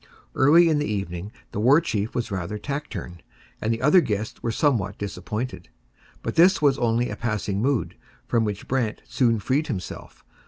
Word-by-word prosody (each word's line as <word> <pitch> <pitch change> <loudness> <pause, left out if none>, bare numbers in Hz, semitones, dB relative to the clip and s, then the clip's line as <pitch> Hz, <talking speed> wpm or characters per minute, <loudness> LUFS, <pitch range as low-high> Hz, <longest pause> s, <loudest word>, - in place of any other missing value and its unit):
Early 160 +6 +6
in 155 -2 +2
the 150 - -1
evening 95 -1 -4 0.2
the - - -4
War 130 +8 +6
Chief 110 -10 -2
was 120 -3 -2
rather 100 +2 -3
taciturn, 105 - -6 0.4
and 110 - 0
the 115 +2 -2
other 165 +6 +6
guests 105 -5 -3
were - - -2
somewhat 110 -6 +1
disappointed. 105 0 -5 0.5
But - - -2
this 180 +3 +5
was 140 -2 +3
only 120 0 +1
a - - -4
passing 105 -3 -2
mood, 135 -1 0 0.3
from 115 -1 +1
which 105 -2 -4
Brant 125 -5 -1
soon 115 -3 +2
freed 130 +9 0
himself. 95 - -7
115 Hz, 170 wpm, -24 LUFS, 105-140 Hz, 0.5 s, Early